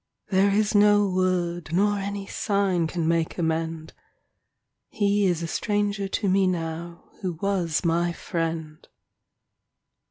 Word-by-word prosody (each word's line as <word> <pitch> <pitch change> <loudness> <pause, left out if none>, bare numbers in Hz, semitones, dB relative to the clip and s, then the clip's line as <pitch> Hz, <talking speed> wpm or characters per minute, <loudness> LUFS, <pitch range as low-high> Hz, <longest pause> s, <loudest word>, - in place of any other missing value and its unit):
There 195 +1 +3
is 210 +2 +1
no 205 0 +5
word 180 -3 -1
nor 205 +3 +2
any 200 0 -4
sign 195 -5 0
Can 165 -1 -2
make 165 -1 0
amend 160 -1 -2 0.5
— - - -55 0.2
He 205 -1 +1
is 170 -2 0
a - - -2
stranger 205 +1 -1
to 200 +1 -2
me 190 0 +3
now 170 -1 -4 0.2
Who 185 -3 -2
was 175 -1 -1
my 170 +1 +2
friend. 165 -2 -4
185 Hz, 130 wpm, -25 LUFS, 165-200 Hz, 0.5 s, no